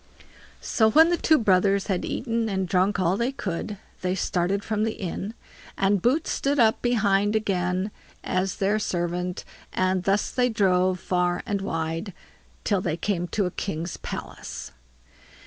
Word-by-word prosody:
So 220 -2 +3
when 320 +7 +6
the - - +4
two 320 -2 +4
brothers 195 -3 +3
had 190 -3 -1
eaten 230 -2 -1
and 190 -2 -1
drunk 190 +3 +2
all 180 0 +2
they 235 +4 0
could, 205 -3 -4 0.2
they 185 0 0
started 190 +2 0
from 215 0 -1
the 220 0 0
inn, 195 +4 -5 0.4
and 195 -1 +2
Boots 275 - +1
stood 280 +1 0
up 225 0 +4
behind 210 -3 +2
again 185 -2 0 0.3
as 185 +1 -1
their 205 +2 +1
servant, 180 -2 -2 0.3
and 185 0 +1
thus 195 +3 +1
they 250 -1 +2
drove 185 -4 +2
far 180 -1 0
and 200 -1 -1
wide, 165 +1 -3 0.5
till 200 -3 +1
they 165 -3 -1
came 175 -1 -1
to 200 +2 0
a 180 - -2
king's 170 -3 -4
palace. - - -7
195 Hz, 155 wpm, -25 LUFS, 180-215 Hz, 0.5 s, when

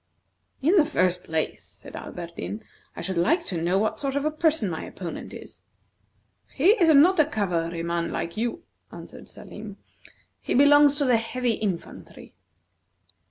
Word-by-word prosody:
"In 345 +8 +4
the 330 - +7
first 180 - 0
place," 160 -1 -2
said - - -13
Alberdin, 175 +5 -7 0.3
"I - - -6
should 190 -3 -2
like 320 - +2
to 170 -3 -3
know 175 +3 +1
what 215 +2 0
sort 275 -1 -2
of 285 +1 -1
a 305 - +1
person 310 -7 +1
my 160 -3 -4
opponent 175 -3 -7
is." - - -11 0.9
"He 310 +7 +3
is 375 -8 +3
not 335 +6 +6
a 305 - +6
cavalryman 170 - -2
like 170 - -4
you," 240 +10 -3 0.3
answered - - -11
Salim; - - -10 0.6
"he - - -2
belongs 290 +1 +6
to 290 -1 0
the 250 -3 +4
heavy 240 +2 -1
infantry." 200 -5 -6
225 Hz, 155 wpm, -25 LUFS, 175-290 Hz, 0.9 s, the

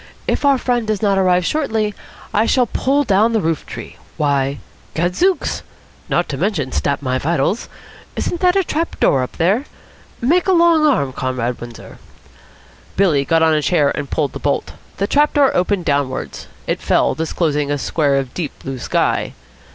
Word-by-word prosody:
If - - 0
our 280 -1 +5
friend 245 -3 -1
does 215 -1 -1
not 200 -2 +3
arrive 180 -1 +3
shortly, 220 - 0 0.4
I 215 +2 +2
shall 255 -2 +3
pull 275 +5 +1
down 220 0 +3
the 220 - +3
roof. 165 -5 -1 0.5
Why, 140 -1 +1 0.4
gadzooks! 180 - 0 0.5
Not - - +1
to - - -3
mention 160 -11 -1
stap 140 0 -1
my 130 -1 0
vitals! 170 - 0 0.5
Isn't 345 - -2
that 360 0 +4
a 390 - +3
trap 330 0 -3
door 135 - +3
up 125 - -5
there? 195 - +2 0.5
Make 340 +10 +2
a 380 - +4
long 335 -3 +5
arm, 140 - +1
Comrade 125 -2 -2
Windsor." 120 -1 -10 1.0
Billy 155 -8 +3
got 165 +3 +3
on 160 -1 +4
a 155 - +2
chair 150 -3 +2
and 140 - -4
pulled 145 -3 -1
the - - -6
bolt. 145 - -1 0.2
The 200 - 0
trap 295 +7 +2
door 285 -2 +4
opened 180 0 +1
downwards. 140 -3 -2 0.2
It - - -2
fell, - - +2
disclosing 155 -2 -1
a 145 - 0
square 145 0 +1
of 135 -3 -2
deep 165 -5 -4
blue 135 -1 -6
sky. - - 0
180 Hz, 175 wpm, -18 LUFS, -, 1.0 s, our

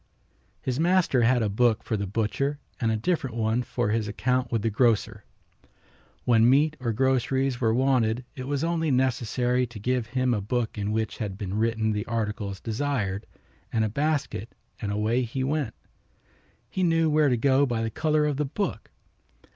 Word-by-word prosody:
His 130 +1 -1
master 170 -6 +3
had 120 0 +3
a - - +1
book 110 +2 +2
for 110 - -2
the 100 -1 -2
butcher 115 +8 -1 0.2
and 115 -2 +1
a 110 - +1
different 135 -1 -1
one 110 +1 +1
for 120 -1 -2
his 110 0 0
account 125 +3 0
with 115 -3 0
the 115 - +1
grocer. 115 0 +1 1.0
When 115 -1 +5
meat 150 +4 +4
or 120 -3 -1
groceries 130 +2 +1
were 115 -2 +3
wanted 125 -1 +2
it 130 -1 -6
was 140 +1 -1
only 165 -1 0
necessary 125 -1 +1
to 120 -1 -11
give 125 +1 -1
him 130 +1 +1
a 105 - -1
book 115 +3 -2
in 105 0 -2
which 110 0 -2
had 100 -4 -4
been 95 -2 -4
written 110 0 +1
the 105 +2 -2
articles 105 -4 -3
desired 110 -5 -2 0.4
and 110 -1 +1
a - - -1
basket 140 -4 -2 0.3
and 105 -3 -2
away 110 +4 +1
he 130 +2 -3
went. 140 -4 -1 0.9
He 185 - -3
knew 165 -2 +3
where 150 -1 +3
to 125 - +2
go 140 +3 +3
by 115 -2 -1
the 115 - -2
color 155 +1 +1
of 145 -2 0
the 150 - 0
book. 195 +9 -3
120 Hz, 180 wpm, -26 LUFS, 110-135 Hz, 1.0 s, When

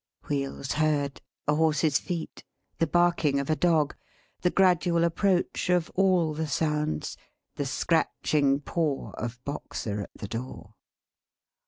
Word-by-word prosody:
Wheels 140 -1 -2
heard. 150 -3 0 0.3
A 150 - +4
horse's 155 -2 +3
feet. 170 -3 -5 0.4
The 165 - +2
barking 170 -5 +3
of 140 +2 -1
a - - +3
dog. 155 -4 +2 0.5
The 180 - +3
gradual 175 -2 +3
approach 180 +2 +1
of 180 -2 +2
all 180 -4 +3
the 160 +1 -2
sounds. 150 - -1 0.4
The 145 - -2
scratching 145 -2 +1
paw 150 -2 -1
of 120 +2 -5
Boxer 110 -7 -4
at - - -7
the 100 - -5
door! 115 -2 -7
155 Hz, 130 wpm, -27 LUFS, 140-170 Hz, 0.5 s, A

